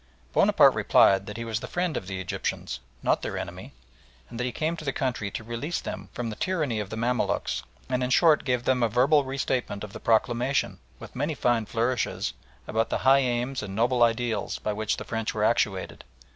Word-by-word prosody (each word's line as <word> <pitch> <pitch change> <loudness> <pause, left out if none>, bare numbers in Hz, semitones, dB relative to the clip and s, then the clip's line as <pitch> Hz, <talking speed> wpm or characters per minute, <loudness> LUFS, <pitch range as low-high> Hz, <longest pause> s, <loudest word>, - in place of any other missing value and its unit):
Bonaparte - - +6
replied 95 0 +4
that 105 +1 -6
he 115 - -4
was 110 -1 -2
the - - -7
friend 175 -3 -1
of 90 - -4
the 95 -1 -4
Egyptians 90 -7 -3 0.2
not - - +2
their - - -4
enemy - - -6 0.6
that 120 +1 -3
he 125 - -1
came 160 +6 -1
to 160 - -9
the 135 - -1
country 125 -7 -2
to 110 - -6
release 120 +9 -3
them 95 0 -6
from 115 -2 -4
the - - -6
tyranny 155 - -1
of 105 -2 -4
the 110 - -5
Mamaluks, 120 +1 0 0.3
and 125 0 0
in 125 - -1
short 155 +2 +5
gave 125 -2 0
them 130 -1 +2
a 115 - +3
verbal 135 +6 +4
restatement 130 -6 -2
of 105 -1 -8
the - - -7
proclamation, 120 +4 +1 0.2
with - - -11
many 145 +4 -1
fine 120 -5 +1
flourishes, 120 +2 -1 0.3
about 110 0 0
the - - 0
high 135 +1 +7
aims 125 0 -1
and 100 -2 -6
noble 120 +3 +2
ideals 115 -2 +1
by 105 - -2
which 110 +1 -1
the - - -5
French 115 -1 -3
were 105 - 0
actuated. 105 -4 0
120 Hz, 205 wpm, -27 LUFS, 110-130 Hz, 0.6 s, high